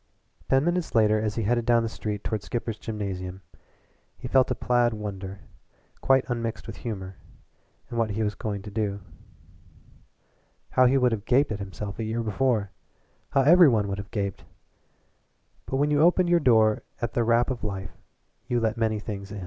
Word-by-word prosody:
Ten 135 +2 +3
minutes 175 -5 -1
later 110 -1 +4
as 110 -1 -2
he 115 - -1
headed 120 +3 +1
down 115 0 +3
the - - -1
street 105 -2 -5
toward 110 -2 -2
Skipper's 115 -1 -4
Gymnasium 95 -4 -5 0.7
he 125 - -7
felt 130 +1 +3
a - - 0
placid 120 -2 +1
wonder, 100 -2 -6 0.6
quite 135 0 +3
unmixed 115 -2 -3
with - - -8
humor, 95 -5 -6 0.7
at - - -6
what 115 -2 +1
he 110 +2 -1
was 105 -1 -1
going 100 0 -4
to 105 - -8
do. 100 -1 -2 1.7
How 130 0 +5
he 135 +2 +3
would 125 -2 +3
have 110 -2 -3
gaped 130 +1 +3
at 105 - -3
himself 100 +2 -6
a - - -1
year 115 +2 -2
before! 110 -2 0 0.6
How 135 - +3
every 170 +2 +7
one 110 -4 +1
would 100 0 -3
have 100 - -7
gaped! 100 -2 -3 1.2
But - - -2
when 145 +2 +1
you 145 0 +3
opened 175 +2 +4
your 175 0 +5
door 110 -6 +4 0.2
at 120 -1 -3
the 120 - +1
rap 120 +3 +2
of 125 - -5
life 95 -2 -4 0.6
you 120 -1 +1
let 110 0 0
in - - -6
many 110 -1 +1
things. 100 -1 -7
110 Hz, 185 wpm, -26 LUFS, 105-125 Hz, 1.7 s, every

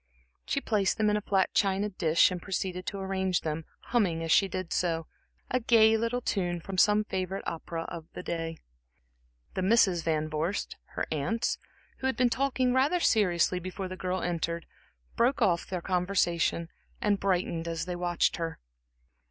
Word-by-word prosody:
She 280 - +1
placed 210 -7 +1
them 215 -1 +3
in - - +2
a - - -2
flat 195 -2 +1
china 195 0 +2
dish 170 -3 +3
and 180 -1 -4
proceeded 185 -1 -3
to 200 - -3
arrange 190 -1 0
them, 155 0 -3 0.3
humming, 185 -9 +2
as 165 - -2
she 195 - +5
did 185 -2 -4
so, 165 -2 0 0.5
a 255 - +2
gay 225 -2 +5
little 230 +2 0
tune 175 -6 -1
from 185 +2 -4
some 210 +2 +5
favorite 190 -1 -3
opera 165 0 -4
of 165 -1 -8
the - - -7
day. 165 -1 -3 1.0
The 185 - -2
Misses 190 -3 +4
Van 155 -1 0
Vorst, 155 +6 -2 0.2
her - - -1
aunts, 160 +10 -1 0.4
who 265 - -1
had 265 - -1
been 250 -2 +3
talking 255 0 +1
rather 280 +7 +3
seriously 180 - +3
before 185 +2 -5
the 185 - -6
girl 185 0 -2
entered, 170 -1 -2 0.5
broke 250 +4 +2
off 170 -3 +2
in - - -21
their 180 -2 -3
conversation 175 -2 +1 0.3
and 205 -1 +1
brightened 175 -3 0
as 165 -1 -2
they 180 -1 -3
watched 175 -1 +1
her. 165 -1 -4
185 Hz, 175 wpm, -29 LUFS, 170-210 Hz, 1.0 s, she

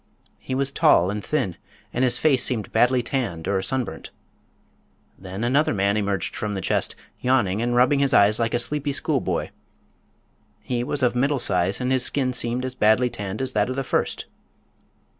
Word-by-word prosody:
He 130 - -5
was 135 0 0
tall 90 -8 +4
and 105 0 -5
thin 100 - -2 0.4
and 125 - 0
his 125 - +3
face 140 -5 +3
seemed 115 -5 0
badly 125 +2 +3
tanned 115 -11 -3
or 95 -1 0
sunburnt. 110 -5 -3 1.1
Then 95 +3 -7
another 135 +2 +2
man 100 +1 +1
emerged 100 -4 -2
from 105 -1 -3
the - - -2
chest, - - 0 0.2
yawning 120 -6 +1
and 120 0 0
rubbing 130 +3 +4
his 140 -1 +2
eyes 105 -1 +4
like 115 0 0
a - - +3
sleepy 145 +4 -2
schoolboy. - - -1 1.1
He 120 -1 -2
was 140 +1 -2
of 125 0 +2
middle 140 +3 +1
size 90 -4 +1
and 125 0 -1
his 130 -1 +3
skin 130 -2 0
seemed 125 +1 -1
as 130 - -4
badly 120 +2 +3
tanned 100 +4 -5
as 130 0 -4
that 105 +2 +1
of 130 - -3
the 135 - -2
first. - - -1
120 Hz, 180 wpm, -23 LUFS, 100-130 Hz, 1.1 s, tall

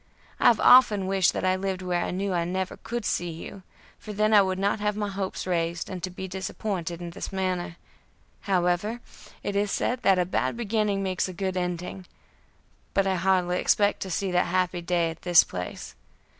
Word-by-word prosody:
I - - +5
have 235 - +5
often 215 -6 +6
wished 190 -1 +3
that - - -2
I 185 0 +3
lived 190 -1 -3
where 175 -1 0
I - - -3
knew 190 +1 -2
I 170 -1 +1
never 185 +2 -3
could 235 -2 -5
see 175 - -1
you, 165 +4 -8 0.4
for 210 - -8
then 215 +1 +2
I 205 - +8
would 190 -1 0
not 200 +2 0
have 210 0 0
my 205 -1 -2
hopes 195 -1 -4
raised, 170 -1 -2
and 185 -1 -5
to 185 - -3
be 190 +1 -7
disappointed 185 -2 -4
in 170 -1 -6
this - - -6
manner; 185 -3 -2 0.6
however, 190 +4 0 0.4
it 200 - -3
is 205 0 +1
said 250 0 -1
that 195 -4 +4
a 180 - +2
bad 150 - -1
beginning 210 -3 0
makes 185 -1 -1
a - - -6
good 190 +1 -3
ending, 180 +1 -4 0.9
but 195 - +3
I 190 - +1
hardly 180 -1 +1
expect 205 -1 +2
to 190 - -5
see 190 +2 -1
that 180 0 +2
happy 180 0 0
day 170 -1 0
at 160 - -12
this 175 -2 +6
place. 90 0 -7
185 Hz, 200 wpm, -26 LUFS, 175-200 Hz, 0.9 s, I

